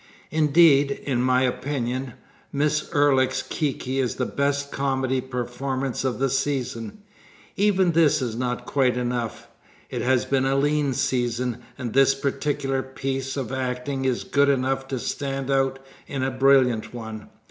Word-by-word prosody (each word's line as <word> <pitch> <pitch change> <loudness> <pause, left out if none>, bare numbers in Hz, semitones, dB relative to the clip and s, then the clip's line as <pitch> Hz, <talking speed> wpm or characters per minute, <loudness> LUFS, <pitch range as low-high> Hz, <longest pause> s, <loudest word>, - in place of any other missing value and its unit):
Indeed, 150 -2 +4
in 125 -4 0
my 130 0 +3
opinion, 130 -1 -2 0.4
Miss 150 +1 0
Ulric's 140 -3 +3
Kiki 135 -3 -2
is 125 -3 0
the 125 - -1
best 140 +1 -1
comedy 130 -1 0
performance 130 +1 -3
of 130 -2 -1
the 135 - +1
season. 130 - -2 0.5
Even 195 -3 +3
this 155 -2 +4
is 120 -4 -3
not 125 0 -2
quite 130 -3 +1
enough. 120 -2 -3 0.4
It - - -2
has 130 -1 +2
been 135 -1 +1
a 135 0 +2
lean 145 0 +1
season, 120 -1 -1 0.2
and 120 -3 -5
this 135 0 +5
particular 135 -1 -1
piece 135 0 -4
of 130 -3 -3
acting 130 +1 -2
is 130 -2 0
good 140 0 +2
enough 135 0 0
to 135 - -3
stand 135 +2 -3
out 135 -1 +2 0.3
in 135 -2 -3
a 130 - 0
brilliant 130 -3 +3
one. 110 -2 -7
135 Hz, 145 wpm, -24 LUFS, 125-140 Hz, 0.5 s, this